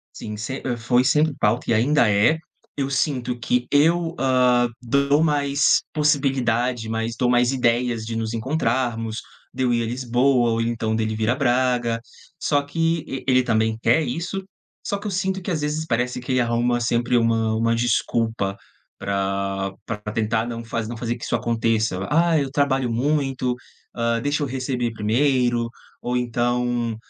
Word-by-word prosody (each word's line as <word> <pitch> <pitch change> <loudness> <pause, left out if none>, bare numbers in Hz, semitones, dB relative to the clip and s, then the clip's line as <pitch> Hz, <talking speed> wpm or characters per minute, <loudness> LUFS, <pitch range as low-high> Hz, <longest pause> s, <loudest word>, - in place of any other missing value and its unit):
Sim, 105 0 -6
se 110 +6 -5
hã, 125 -2 -1
foi 120 +2 +2
sempre 150 +2 +3
pauta 110 +2 +1
e - - +4
ainda 120 +2 +3
é. 105 +11 +3 0.4
Eu 140 -1 -1
sinto 130 -3 -1
que 125 0 0
eu, 165 +3 +3
hã, 125 -2 +3
dou 140 +4 +2
mais 145 -2 +3
possibilidade, 130 -6 +1
mais 115 +1 -2
dou 125 -1 +2
mais 125 +1 +3
ideias 120 -2 +1
de 115 +1 -5
nos 115 0 -2
encontrarmos, 120 -3 -1 0.3
de - - -3
eu 125 - +2
ir 120 0 +1
à - - -2
Lisboa 125 +1 +2
ou 115 - 0
então 115 -1 -1
dele 110 -1 -1
vir 110 +1 0
a - - +2
Braga. 125 -3 +1 0.4
Só 145 -1 +1
que, 165 +2 -1
e 135 - -6
ele 130 -1 +5
também 110 -2 +1
quer 160 - +4
isso, 170 +8 -3 0.4
só 200 - -1
que 205 - -8
eu - - -1
sinto 190 0 -1
que 185 - -4
às 165 -4 -1
vezes 150 +2 -2
parece 125 -1 -1
que 125 +2 -4
ele 130 - +3
arruma 120 0 +1
sempre 120 +1 +1
uma 115 -1 +2
uma 115 +1 +1
desculpa 115 -3 0 0.4
pra 100 0 -2
pra 115 - -3
tentar 110 +1 0
não 115 -1 -5
faze 115 -1 -3
não 120 - -5
fazer 120 +1 -2
que 120 - -8
isso - - 0
aconteça. 110 -3 0
"Ah, 165 +1 +3
eu 140 -2 -1
trabalho 135 -3 +1
muito, 135 0 0 0.4
hã, 115 0 0
deixa 145 +4 -1
eu - - 0
receber 125 -2 -2
primeiro", 120 +2 +1 0.3
ou 125 +1 -2
então 120 -1 0
120 Hz, 175 wpm, -22 LUFS, 115-140 Hz, 0.4 s, ele